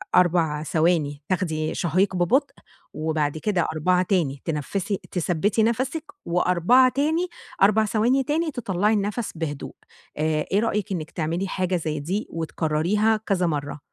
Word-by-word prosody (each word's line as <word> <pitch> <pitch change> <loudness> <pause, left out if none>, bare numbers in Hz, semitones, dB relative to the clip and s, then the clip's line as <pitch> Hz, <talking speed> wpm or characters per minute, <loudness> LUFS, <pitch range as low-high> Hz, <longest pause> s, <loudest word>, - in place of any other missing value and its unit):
4 165 -4 +3
ثواني، 155 -3 +1
تاخدي 160 -5 -1
شهيق 185 +3 +1
ببطء 250 - +2 0.4
وبعد 155 -1 -1
كده 175 +2 0
4 180 +4 +2
تاني، 155 -8 0
تنفّسي 175 +6 -2
تثبّتي 190 +5 +1
نَفَسِك 260 +7 0 0.2
و4 180 +9 +4
تاني، 320 +5 +1 0.3
4 215 +2 +5
ثواني 235 +6 +2
تاني، 315 +3 0
تطلعي 210 -4 0
النَّفَس 210 +2 -1
بهدوء. 150 -3 -5 0.4
آآ، 155 0 0
إيه 200 - +3
رأيِك 210 -3 -1
إنِّك 160 -3 -4
تعملي 170 +4 -2
حاجة 185 0 -1
زي 155 -3 -2
دي 190 +9 -3
وتكرريها 165 +7 0
كذا 185 -3 +1
مرة؟ 145 -2 -3
180 Hz, 135 wpm, -24 LUFS, 155-210 Hz, 0.4 s, 4